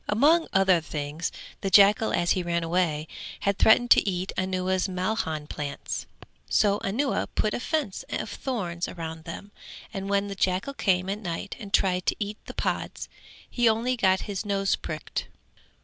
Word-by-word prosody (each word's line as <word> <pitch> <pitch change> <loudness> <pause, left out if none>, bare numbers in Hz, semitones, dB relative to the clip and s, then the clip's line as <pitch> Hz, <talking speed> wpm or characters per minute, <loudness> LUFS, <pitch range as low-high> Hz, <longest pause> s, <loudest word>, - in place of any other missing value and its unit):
Among 300 +10 +4
other 190 -3 +4
things 150 +1 -4 0.3
the 195 - -1
jackal 205 +3 +6
as 175 - +1
he 185 - +2
ran 170 -1 -1
away, 165 -3 0 0.3
had 200 -1 0
threatened 240 +2 +5
to - - +6
eat 185 0 -2
Anuwa's 185 0 0
malhan 180 -5 -2
plants, 145 -2 -5 0.4
so 205 -1 +3
Anuwa 260 +8 0
put 215 - +1
a - - -1
fence 285 - -2
of - - -2
thorns 180 -10 -3
round 160 -2 -7
them 200 +4 -8 0.4
and 195 -1 -4
when 200 0 +1
the 200 - -4
jackal 190 +7 0
came 185 -7 +1
at 200 +2 -2
night 185 0 -4
and 205 -3 -8
tried 185 -2 +2
to - - +3
eat 210 0 -4
the - - -8
pods - - -3 0.4
he 240 -2 +3
only 235 +3 +1
got 190 -5 +3
his 200 -1 -4
nose 195 -2 +1
pricked. 155 -1 -5
195 Hz, 165 wpm, -26 LUFS, 175-210 Hz, 0.4 s, jackal